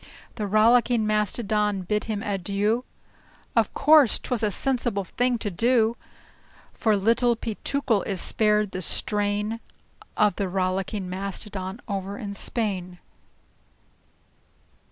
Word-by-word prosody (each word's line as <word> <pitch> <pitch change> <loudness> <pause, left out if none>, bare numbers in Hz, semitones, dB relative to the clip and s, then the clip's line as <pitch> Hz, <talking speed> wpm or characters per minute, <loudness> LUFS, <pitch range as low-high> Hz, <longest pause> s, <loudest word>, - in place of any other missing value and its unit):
The 210 -2 -3
Rollicking 230 +2 +4
Mastodon 210 -1 0
bade 210 +3 -1
him 215 -2 -3
"adieu." 205 +4 -1 0.7
Of - - +3
course 300 -6 +6
't - - -11
was 245 - +1
a 215 - +2
sensible 240 -2 -1
thing 245 +5 0
to 210 -2 -4
do; 230 +3 +2 0.8
For 215 -2 +2
Little 230 +4 +3
Peetookle 230 0 -1
is 195 -3 -2
spared 210 0 +1
the 185 - -4
strain 210 +4 -1 0.6
Of 210 -3 +3
the 195 -2 -1
Rollicking 190 +1 -1
Mastodon 195 +2 -5
over 200 -1 -4
in 205 -5 -5
Spain. 190 -4 -3
210 Hz, 115 wpm, -25 LUFS, 195-230 Hz, 0.8 s, course